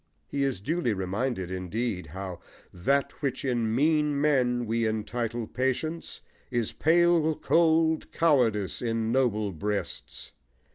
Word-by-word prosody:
He 140 - -3
is 135 -9 0
duly 150 -1 0
reminded, 95 +1 -2
indeed, 95 +1 -3
how 95 +2 -6 0.3
That 140 +10 +1
which 135 -2 -2
in 115 -4 0
mean 150 +1 +2
men 125 -5 +2
we 115 0 0
entitle 115 +2 -2
patience 130 +8 -3 0.3
Is 120 -4 -1
pale 165 -1 +3
cold 160 -1 +2
cowardice 115 - +2
in 115 -2 -1
noble 110 -6 +1
breasts. 100 +4 -5
120 Hz, 115 wpm, -27 LUFS, 105-145 Hz, 0.3 s, pale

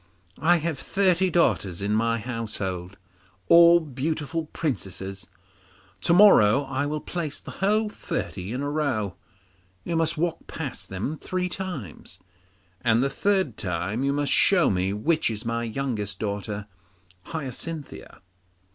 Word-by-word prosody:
I 175 +2 +4
have 160 -3 -3
thirty 190 -1 +2
daughters 105 - +1
in 100 +1 -1
my 115 +1 +2
house, 115 -1 -4 0.9
all 170 0 +8
beautiful 155 +2 -3
princesses. 95 - -4 0.7
To - - +1
morrow 145 - +7
I 135 +1 -2
will 150 +1 -3
place 165 -5 -3
the - - -9
whole 215 +3 +2
thirty 100 - -4
in 125 +3 -3
a 145 - -2
row. 130 - -1 0.7
You 170 - -2
must 165 0 +1
walk 165 +1 -2
past 130 -11 -6
them 105 +12 -4
three 180 0 -2
times, 175 - -6 0.6
and 115 0 +3
the 135 - 0
third 190 - +1
time 95 +6 -2
you 140 - +2
must 145 0 0
show 185 -4 +5
me 95 0 0
which 155 +11 +1
is 110 +1 -5
my 115 0 -1
youngest 110 -5 -3
daughter 100 0 -4 0.6
Hyacinthia. 155 0 -6
140 Hz, 135 wpm, -25 LUFS, 105-165 Hz, 0.9 s, all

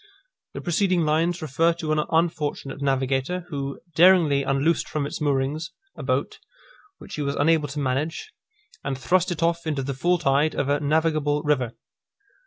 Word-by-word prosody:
The - - -4
preceding 180 0 +1
lines 165 +3 +1
refer 160 +4 +2
to 160 -2 -4
an 155 0 +2
unfortunate 155 -4 -1
navigator, 135 +5 0
who 140 -3 -4
daringly 165 -4 +5
unloosed 140 +4 0
from 150 -2 -2
its 145 - -6
moorings 145 +3 0 0.3
a - - -8
boat, - - -1 0.6
which - - -12
he 150 - -3
was 140 -1 -1
unable 155 0 +2
to 145 +1 -5
manage, 140 +4 -2 0.5
and 135 -1 -3
thrust 180 +7 +1
it 170 -1 -2
off 170 0 0
into 145 -4 -1
the 140 +1 -3
full 175 +7 +1
tide 150 -1 +1
of 140 - -1
a 145 0 +2
navigable 150 0 +1
river. 130 -6 0
150 Hz, 165 wpm, -24 LUFS, 140-165 Hz, 0.6 s, daringly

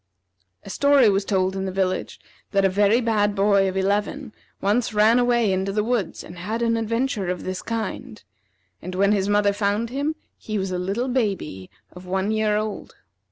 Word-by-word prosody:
A - - -10
story 280 -5 +4
was 195 0 +1
told 190 -1 0
in 190 0 -3
the 190 - -3
village 185 -1 -2 0.3
that 195 -1 +3
a - - +4
very 205 +5 +3
bad 210 -3 +1
boy 200 -1 +3
of 190 - -4
eleven 205 +6 -1 0.3
once 215 +3 0
ran 220 +3 +5
away 240 -4 +2
into 190 +1 -1
the 210 +1 0
woods, 230 -6 -2
and 175 0 -11
had 220 +6 -3
an 230 0 +2
adventure 230 -2 -1
of 180 -1 -3
this 185 0 -4
kind; 230 -1 -5 0.6
and 185 - -6
when 200 +2 +3
his 200 -1 +1
mother 205 0 +3
found 205 +3 -1
him 285 +4 -2 0.2
he 215 -1 -4
was 190 -1 -2
a 180 - -2
little 200 +8 -2
baby 195 - -2 0.2
of 180 0 -12
one 190 +3 -1
year 215 -1 +1
old. 215 0 -5
205 Hz, 190 wpm, -23 LUFS, 190-230 Hz, 0.6 s, ran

